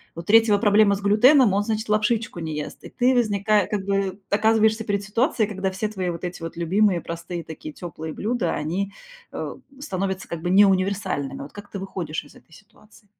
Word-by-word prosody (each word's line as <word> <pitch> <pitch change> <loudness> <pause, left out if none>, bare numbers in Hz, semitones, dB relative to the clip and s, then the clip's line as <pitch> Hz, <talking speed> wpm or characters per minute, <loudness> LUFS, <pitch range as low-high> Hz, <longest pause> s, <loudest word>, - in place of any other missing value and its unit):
У 170 - -5
третьего 220 +1 +5
проблема 205 -1 +4
с 200 - -7
глютеном, 220 +3 +5
он, 200 +1 +2
значит, 220 0 -3
лапшичку 215 -2 0
не 160 -2 -4
ест. 150 - -6
И - - -9
ты 255 +1 +2
возника 210 -3 +2
как 200 -2 -2
бы 195 0 -1
оказываешься 220 +1 +3
перед 205 -1 -1
ситуацией, 225 +2 +1
когда 190 -1 -2
все 210 +3 -3
твои 185 -4 -3
вот 170 +1 -6
эти 175 -1 -5
вот 165 0 -6
любимые, 185 +2 +2
простые 170 0 -6
такие 155 -1 -9
тёплые 160 -2 -7
блюда, 220 -5 -1
они, 190 +6 -3 0.4
э, - - -5 0.2
становятся 190 -5 -3
как 170 -1 -5
бы 175 - -2
не 200 +2 +7
универсальными. 185 -8 -1
Вот 145 - -11
как 205 0 -11
ты 200 - -6
выходишь 180 -5 -4
из - - -17
этой 160 - -20
ситуации? 210 +3 -20
200 Hz, 195 wpm, -23 LUFS, 175-215 Hz, 0.4 s, не